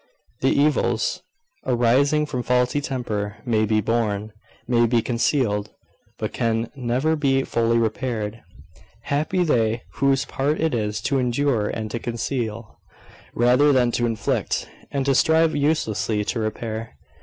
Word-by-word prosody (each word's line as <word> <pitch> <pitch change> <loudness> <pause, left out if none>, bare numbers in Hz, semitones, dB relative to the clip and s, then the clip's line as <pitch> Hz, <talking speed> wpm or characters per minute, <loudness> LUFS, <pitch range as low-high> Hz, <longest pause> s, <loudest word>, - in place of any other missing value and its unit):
The 135 - +2
evils 150 +1 +1 0.4
arising 130 +5 +2
from 130 -4 -3
faulty 125 +3 +1
temper 105 -7 -3
may 110 -3 +2
be 110 0 +2
borne, 110 -2 -1 0.3
may 120 -1 +3
be 120 0 +3
concealed, 115 -4 0 0.5
but - - -4
can 115 0 -1
never 130 +5 0
be 135 -3 +1
fully 115 -1 +1
repaired. 115 -1 -2 0.6
Happy 155 +6 0
they 115 -7 +1
whose 140 0 +2
part 145 +3 -1
it 160 -2 +1
is 105 -2 -1
to 135 +4 0
endure 125 -3 +1
and 110 0 -4
to 115 - -3
conceal, 115 -2 -4 0.6
rather 125 +5 +4
than 125 -3 +3
to 120 0 0
inflict, 115 -2 -1 0.2
and 140 -1 -2
to 140 - +3
strive 160 +4 +3
uselessly 110 -8 0
to 115 - -2
repair! 110 +1 -4
120 Hz, 135 wpm, -23 LUFS, 110-140 Hz, 0.6 s, rather